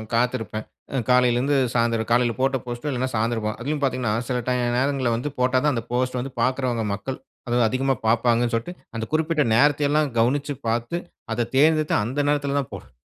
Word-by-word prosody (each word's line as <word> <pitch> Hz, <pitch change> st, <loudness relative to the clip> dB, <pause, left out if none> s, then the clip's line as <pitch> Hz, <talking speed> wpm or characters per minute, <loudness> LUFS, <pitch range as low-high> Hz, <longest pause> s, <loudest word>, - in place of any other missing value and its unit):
காத்திருப்பேன். 115 Hz, -3 st, -1 dB, 0.3 s
அ -, -, 0 dB
காலையிலருந்து 125 Hz, +3 st, +3 dB, 0.2 s
சாயந்திரம் 115 Hz, -1 st, +1 dB
காலையில 120 Hz, -1 st, +3 dB
போட்ட 135 Hz, 0 st, +2 dB
போஸ்ட்டு, 120 Hz, +4 st, -4 dB
இல்லன்னா 130 Hz, 0 st, -1 dB
சாயந்திரம் 115 Hz, 0 st, 0 dB
பா 110 Hz, -, -1 dB
அதிலும் 145 Hz, +3 st, -2 dB
பாத்தீங்கன்னா, 125 Hz, -5 st, 0 dB, 0.2 s
சில 125 Hz, -1 st, 0 dB
டை 125 Hz, -, +2 dB, 0.2 s
நேரங்கள்ல 130 Hz, -2 st, +1 dB
வந்து 135 Hz, +5 st, -3 dB
போட்டா 130 Hz, +1 st, +3 dB
தான், 150 Hz, -1 st, +3 dB
அந்த 115 Hz, -, -2 dB
போஸ்ட் 125 Hz, +1 st, 0 dB
வந்து 130 Hz, +1 st, -5 dB
பாக்கிறவங்க 125 Hz, -2 st, 0 dB
மக்கள், 130 Hz, +6 st, -5 dB, 0.3 s
அது 120 Hz, +1 st, +2 dB
அதிகமா 135 Hz, +2 st, +1 dB
பாப்பாங்கன் 120 Hz, +1 st, +2 dB
சொல்ட்டு 115 Hz, +10 st, -3 dB, 0.2 s
அந்த 115 Hz, 0 st, -2 dB
குறிப்பிட்ட 155 Hz, -1 st, +2 dB
நேரத்தை 145 Hz, +3 st, +4 dB
எல்லாம் 150 Hz, -1 st, +2 dB
கவனிச்சு 140 Hz, +5 st, +1 dB
பாத்து, 120 Hz, +9 st, -1 dB, 0.3 s
அத 115 Hz, +1 st, -1 dB
தேர்ந்தெடுத்து 155 Hz, +2 st, +4 dB
அந்த 125 Hz, +7 st, -3 dB
நேரத்தில 145 Hz, -1 st, 0 dB
தான் 135 Hz, -, -5 dB
போடு -, -, -10 dB
125 Hz, 180 wpm, -23 LUFS, 120-140 Hz, 0.3 s, நேரத்தை